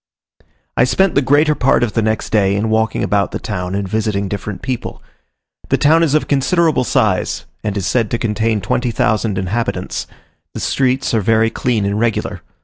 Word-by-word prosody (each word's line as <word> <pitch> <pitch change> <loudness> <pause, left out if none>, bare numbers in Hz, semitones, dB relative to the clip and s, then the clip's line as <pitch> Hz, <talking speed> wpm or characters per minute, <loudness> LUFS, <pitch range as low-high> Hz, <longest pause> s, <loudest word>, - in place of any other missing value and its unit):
I - - +4
spent 190 +9 +2
the 140 - +3
greater 145 +3 +3
part 130 -3 +2
of 115 - -1
the 115 - +1
next 110 0 -1
day 100 -3 +2
in 110 +2 -1
walking 110 0 +1
about 100 -1 +1
the - - -4
town 90 -2 -4
and 100 -1 -2
visiting 105 -1 -1
different 100 +2 -5
people. 130 -2 -4 0.7
The - - +3
town 160 +3 +4
is 155 -3 +2
of 155 - +1
considerable 155 +2 +2
size, - - 0 0.2
and 105 -1 -2
is 95 - -2
said 115 -2 +1
to 120 - -1
contain 110 -1 0
20,000 110 -1 0
inhabitants; 105 +5 -2 0.5
the - - -4
streets 130 -1 0
are 110 - +2
very 115 +2 +2
clean 115 -5 0
and 100 +1 -1
regular. 115 -1 -1
110 Hz, 180 wpm, -17 LUFS, 105-130 Hz, 0.7 s, I